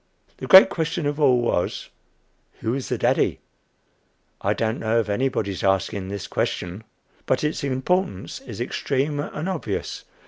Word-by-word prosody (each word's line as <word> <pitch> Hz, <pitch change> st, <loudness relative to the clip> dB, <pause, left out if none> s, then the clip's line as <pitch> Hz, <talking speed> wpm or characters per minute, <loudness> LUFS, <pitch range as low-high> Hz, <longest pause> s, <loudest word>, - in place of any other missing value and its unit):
The -, -, -6 dB
great 190 Hz, -1 st, +10 dB
question 165 Hz, -1 st, -2 dB
of 145 Hz, +1 st, -1 dB
all 130 Hz, -4 st, +5 dB
was, 100 Hz, -7 st, -1 dB, 0.7 s
Who 110 Hz, -, -1 dB
was 130 Hz, +1 st, -3 dB
the -, -, 0 dB
daddy? -, -, +1 dB, 1.0 s
I -, -, +1 dB
don't 110 Hz, +1 st, -1 dB
know 110 Hz, +1 st, +1 dB
of 110 Hz, -2 st, -1 dB
anybody's 105 Hz, -5 st, -1 dB
asking 95 Hz, 0 st, 0 dB
this 100 Hz, 0 st, -5 dB
question, 90 Hz, +5 st, -3 dB, 0.4 s
but 130 Hz, -, +1 dB
its 150 Hz, -1 st, -1 dB
importance 180 Hz, -, -1 dB
is 270 Hz, -, -9 dB
extreme 140 Hz, +4 st, -1 dB
and 150 Hz, +3 st, -4 dB
obvious. 160 Hz, -, -4 dB
130 Hz, 145 wpm, -23 LUFS, 105-150 Hz, 1.0 s, great